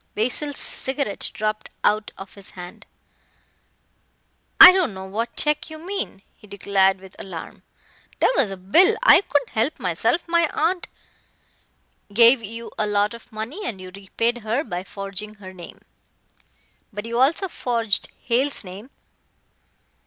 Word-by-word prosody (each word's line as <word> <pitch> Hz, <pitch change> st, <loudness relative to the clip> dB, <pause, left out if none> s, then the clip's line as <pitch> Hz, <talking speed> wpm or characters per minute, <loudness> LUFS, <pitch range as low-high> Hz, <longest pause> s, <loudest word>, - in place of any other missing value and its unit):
Basil's 255 Hz, +6 st, -1 dB
cigarette 265 Hz, -6 st, -2 dB
dropped 215 Hz, 0 st, -3 dB
our 215 Hz, +1 st, +3 dB, 0.2 s
of 195 Hz, 0 st, -10 dB
his 200 Hz, -2 st, -10 dB
hand. 180 Hz, 0 st, -10 dB, 1.7 s
"I -, -, +13 dB
don't 370 Hz, -, 0 dB
know 190 Hz, 0 st, -7 dB
what 220 Hz, +5 st, -4 dB
check 300 Hz, +1 st, +2 dB
you 315 Hz, -, -8 dB
mean," 345 Hz, -, -5 dB
he 210 Hz, -, -18 dB
declared 195 Hz, -1 st, +1 dB
with 190 Hz, 0 st, -15 dB
alarm, 175 Hz, -4 st, -8 dB, 0.6 s
"there -, -, +3 dB
was 210 Hz, -, +2 dB
a 195 Hz, -, -6 dB
bill 345 Hz, -, +4 dB
I -, -, +8 dB
couldn't 290 Hz, -9 st, -1 dB
help 230 Hz, +8 st, -1 dB
myself. 185 Hz, -, 0 dB
My 340 Hz, -1 st, +2 dB
aunt 345 Hz, +3 st, 0 dB, 0.7 s
" -, -, -37 dB
"Gave 235 Hz, +2 st, +7 dB
you 230 Hz, +2 st, -7 dB
a 210 Hz, -, +1 dB
lot 205 Hz, +1 st, +1 dB
of 235 Hz, -, -13 dB
money 225 Hz, -, -6 dB
and 215 Hz, -, -4 dB
you 185 Hz, 0 st, -9 dB
repaid 230 Hz, +5 st, -2 dB
her 230 Hz, +6 st, -1 dB
by 180 Hz, -, -5 dB
forging 200 Hz, +2 st, -5 dB
her 190 Hz, -2 st, -11 dB
name. 175 Hz, -2 st, -11 dB, 1.1 s
But 210 Hz, 0 st, -6 dB
you 235 Hz, +1 st, -2 dB
also 325 Hz, +8 st, +2 dB
forged 230 Hz, -, -1 dB, 0.2 s
Hale's 260 Hz, +3 st, 0 dB
name." 200 Hz, +6 st, -10 dB
220 Hz, 145 wpm, -22 LUFS, 195-280 Hz, 1.7 s, I